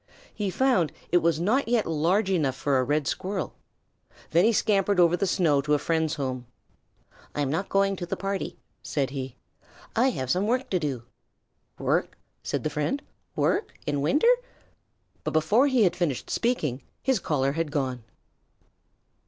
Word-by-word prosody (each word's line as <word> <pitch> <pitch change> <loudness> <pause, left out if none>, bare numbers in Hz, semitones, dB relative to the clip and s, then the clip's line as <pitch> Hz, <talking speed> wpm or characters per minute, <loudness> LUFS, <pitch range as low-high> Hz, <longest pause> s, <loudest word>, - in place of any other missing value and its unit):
He 205 -2 -2
found 190 - +2 0.2
it 175 - +5
was 165 -2 +1
not 225 +11 +1
yet 235 -2 +2
large 175 +6 +1
enough 145 -8 +1
for 135 0 +1
a - - +2
Red 145 +3 0
Squirrel. 190 +6 -3 0.8
Then 170 +2 +5
he 230 - +5
scampered 200 -3 +2
over 175 0 +5
the 195 +2 0
snow 155 -6 +3
to 150 +1 +2
a - - +3
friend's 160 +1 0
home. 130 -4 -4 0.9
"I'm 145 -2 0
not 180 +6 -2
going 195 0 +2
to 175 - -5
the - - -3
party," 195 -1 -3 0.2
said 135 -3 -1
he. 135 -2 -5 0.6
"I 250 +4 +4
have 130 - -2
some 190 +3 +1
work 250 +3 0
to 185 - +2
do." 135 -7 -3 0.7
"Work?" - - 0 0.2
said - - -3
the 155 - -1
friend. 150 - -1 0.3
"Work? - - 0
In 145 -1 -1
winter?" 300 - +4 0.9
But - - -3
before 205 - +4
he 260 -5 +3
had 180 - +3
finished 160 -8 -2
speaking 155 - 0 0.2
his 265 -4 +2
caller 135 -5 0
had 165 +1 -2
gone. 130 -5 -2
170 Hz, 165 wpm, -26 LUFS, 145-200 Hz, 0.9 s, it